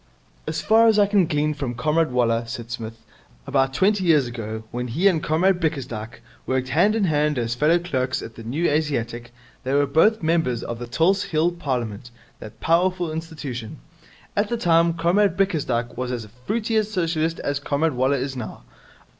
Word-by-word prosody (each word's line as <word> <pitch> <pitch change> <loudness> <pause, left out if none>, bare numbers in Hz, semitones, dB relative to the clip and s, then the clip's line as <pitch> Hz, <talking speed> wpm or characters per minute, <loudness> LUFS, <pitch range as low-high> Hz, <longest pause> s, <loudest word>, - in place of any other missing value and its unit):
'As - - -2
far 225 +1 +5
as 220 -2 +4
I 205 - +6
can 200 -4 +2
glean 150 0 0
from 135 -5 -4
Comrade 155 +6 +1
Waller,' 115 -2 +1
said 115 -1 -7
Psmith, 115 -1 -7 0.4
'about 135 0 +1
twenty 195 +3 +2
years 155 -6 +4
ago, 110 -2 -6
when 125 +1 -3
he 165 +12 +2
and 170 -5 +2
Comrade 175 +5 +2
Bickersdyke 120 -8 -4 0.2
worked 130 0 -1
hand 190 +10 +3
in 220 - +1
hand 150 -4 +1
as 115 -1 -1
fellow 150 +7 +3
clerks 130 -7 -2
at 115 - -9
the 115 - -11
New 145 +10 -1
Asiatic, 120 -6 -1 0.3
they 135 +1 -1
were 145 0 +4
both 165 +9 +3
members 160 -7 +1
of 120 -1 -5
the 120 - -6
Tulse 175 +10 +2
Hill 160 +2 +1
Parliament, 125 - -4 0.3
that 110 - -11
powerful 175 0 +1
institution. 150 -8 -6 0.6
At 205 +1 +1
that 235 -1 -2
time 170 0 +3
Comrade 180 +3 +2
Bickersdyke 145 -11 0
was 125 0 -3
as 115 -3 -4 0.2
fruity 225 +1 0
a 215 - +4
Socialist 165 -5 -1
as 145 0 -1
Comrade 145 +2 0
Waller 130 +3 +1
is 135 +1 -3
now. 110 - -7
150 Hz, 180 wpm, -23 LUFS, 120-175 Hz, 0.6 s, I